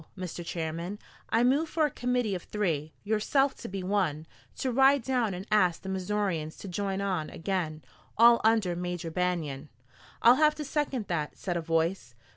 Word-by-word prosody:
Mister 180 Hz, -2 st, -6 dB
Chairman, 170 Hz, +3 st, -4 dB, 0.3 s
I 225 Hz, +2 st, +3 dB
move 285 Hz, +6 st, +2 dB
for 315 Hz, -2 st, +2 dB
a 295 Hz, -, -1 dB
committee 245 Hz, -4 st, 0 dB
of 180 Hz, -, -3 dB
three, 165 Hz, -8 st, -2 dB
yourself 225 Hz, +6 st, +2 dB
to -, -, -7 dB
be 190 Hz, -1 st, -5 dB
one, 180 Hz, -6 st, 0 dB, 0.3 s
to 260 Hz, -, -2 dB
ride 270 Hz, +1 st, +5 dB
down 240 Hz, -6 st, 0 dB
and 185 Hz, +2 st, -7 dB
ask 185 Hz, -5 st, +3 dB
the 190 Hz, -, -5 dB
Missourians 190 Hz, -4 st, -2 dB
to -, -, -9 dB
join 195 Hz, +1 st, -2 dB
on 185 Hz, -6 st, -1 dB
again, 165 Hz, -4 st, -3 dB, 0.3 s
all 235 Hz, +1 st, +7 dB
under 220 Hz, -5 st, +3 dB
Major 175 Hz, -1 st, -4 dB
Banion." 160 Hz, -5 st, -2 dB, 0.5 s
"I'll 240 Hz, +2 st, +8 dB
have 305 Hz, 0 st, +4 dB
to 300 Hz, -, -5 dB
second 275 Hz, -6 st, -1 dB
that," 155 Hz, -4 st, -2 dB
said 180 Hz, -2 st, -3 dB
a 170 Hz, -, -1 dB
voice. 165 Hz, -5 st, -1 dB
190 Hz, 175 wpm, -29 LUFS, 170-235 Hz, 0.5 s, I'll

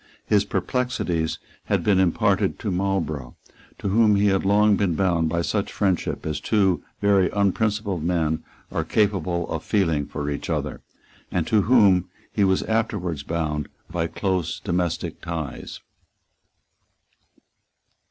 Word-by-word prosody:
His 105 Hz, -1 st, +3 dB
perplexities 100 Hz, -10 st, -1 dB, 0.3 s
had -, -, 0 dB
been 100 Hz, -3 st, +3 dB
imparted 95 Hz, -3 st, +2 dB
to 100 Hz, -, -3 dB
Marlborough, 85 Hz, -9 st, -2 dB, 0.4 s
to 100 Hz, -, -3 dB
whom 105 Hz, +1 st, +4 dB
he 100 Hz, +1 st, +3 dB
had 95 Hz, -1 st, +1 dB
long 105 Hz, +1 st, +4 dB
been 95 Hz, -4 st, 0 dB
bound 85 Hz, -4 st, +1 dB
by 85 Hz, +1 st, 0 dB
such 100 Hz, +3 st, -1 dB
friendship 95 Hz, -4 st, -1 dB
as 75 Hz, -2 st, -2 dB
two 95 Hz, -5 st, +1 dB, 0.2 s
very 100 Hz, -2 st, +4 dB
unprincipled 100 Hz, -2 st, 0 dB
men 80 Hz, -2 st, 0 dB, 0.3 s
are -, -, -1 dB
capable 95 Hz, -5 st, 0 dB
of -, -, -3 dB
feeling 80 Hz, -8 st, +1 dB
for 75 Hz, -1 st, -4 dB
each 70 Hz, -, -5 dB
other, -, -, -2 dB, 0.5 s
and 85 Hz, -3 st, 0 dB
to 110 Hz, +3 st, +3 dB
whom 100 Hz, -6 st, +4 dB, 0.2 s
he 105 Hz, -, +2 dB
was 95 Hz, -1 st, +2 dB
afterwards 105 Hz, -8 st, -1 dB
bound 75 Hz, -1 st, -2 dB, 0.2 s
by 85 Hz, -2 st, -1 dB
close 90 Hz, -2 st, -2 dB
domestic 90 Hz, -3 st, -2 dB
ties. 80 Hz, -6 st, -5 dB
95 Hz, 135 wpm, -24 LUFS, 80-100 Hz, 0.5 s, whom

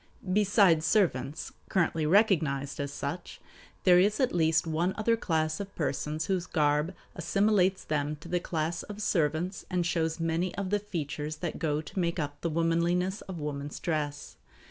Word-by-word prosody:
Besides 200 Hz, -5 st, +4 dB
servants, 160 Hz, -, +1 dB, 0.2 s
currently 165 Hz, -4 st, +1 dB
recognized 155 Hz, -8 st, +2 dB
as 140 Hz, 0 st, -2 dB
such, 145 Hz, +5 st, -5 dB, 0.4 s
there 180 Hz, -1 st, +7 dB
is 205 Hz, +3 st, +3 dB
at 260 Hz, -2 st, +2 dB
least 160 Hz, -1 st, +3 dB
one 165 Hz, +4 st, 0 dB
other 230 Hz, +1 st, +2 dB
class 155 Hz, -7 st, -1 dB
of 200 Hz, -1 st, -7 dB
persons 150 Hz, 0 st, -2 dB
whose 185 Hz, -2 st, -1 dB
garb 150 Hz, +2 st, +1 dB, 0.2 s
assimilates 190 Hz, +1 st, +2 dB
them 150 Hz, 0 st, -1 dB
to 155 Hz, +3 st, -13 dB
the 175 Hz, +1 st, 0 dB
class 165 Hz, 0 st, -2 dB
of 210 Hz, 0 st, -9 dB
servants 175 Hz, -2 st, 0 dB
and 180 Hz, -1 st, 0 dB
shows 165 Hz, -1 st, 0 dB
many 165 Hz, +2 st, -1 dB
of 200 Hz, -1 st, -3 dB
the 205 Hz, -, +2 dB
features 155 Hz, -6 st, -4 dB
that 165 Hz, +1 st, -4 dB
go 150 Hz, -2 st, 0 dB
to 160 Hz, -, -6 dB
make 170 Hz, -1 st, 0 dB
up 145 Hz, -2 st, -4 dB
the 170 Hz, -, -1 dB
womanliness 170 Hz, +4 st, +1 dB
of 185 Hz, -, -5 dB
woman's 145 Hz, -1 st, -4 dB
dress. 150 Hz, -3 st, -3 dB
165 Hz, 165 wpm, -29 LUFS, 150-185 Hz, 0.4 s, there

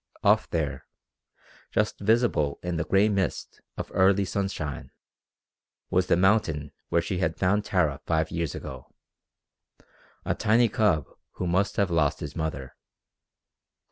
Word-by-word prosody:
Off -, -, +3 dB
there, 70 Hz, -4 st, -3 dB, 0.8 s
just -, -, 0 dB
visible 105 Hz, -, +2 dB
in 90 Hz, -1 st, -2 dB
the 80 Hz, -, 0 dB
gray 95 Hz, +6 st, +3 dB
mist 95 Hz, -5 st, -2 dB, 0.2 s
of -, -, -5 dB
early 95 Hz, +1 st, +4 dB
sunshine, 90 Hz, -7 st, -3 dB, 1.0 s
was 90 Hz, 0 st, +2 dB
the -, -, +3 dB
mountain 90 Hz, -7 st, +2 dB, 0.2 s
where 85 Hz, 0 st, +2 dB
she 90 Hz, +1 st, -3 dB
had 80 Hz, -3 st, -1 dB
found 100 Hz, +3 st, +2 dB
Tara 80 Hz, -9 st, 0 dB
five 80 Hz, -1 st, +1 dB
years 85 Hz, -2 st, -2 dB
ago 65 Hz, -2 st, -9 dB, 1.3 s
a -, -, +1 dB
tiny 115 Hz, +2 st, +3 dB
cub 95 Hz, -, +2 dB, 0.3 s
who 90 Hz, -, -4 dB
must 95 Hz, +3 st, +1 dB
have 100 Hz, -3 st, +1 dB
lost 80 Hz, -4 st, +1 dB
his -, -, -6 dB
mother. 80 Hz, -5 st, -4 dB
90 Hz, 135 wpm, -26 LUFS, 80-100 Hz, 1.3 s, early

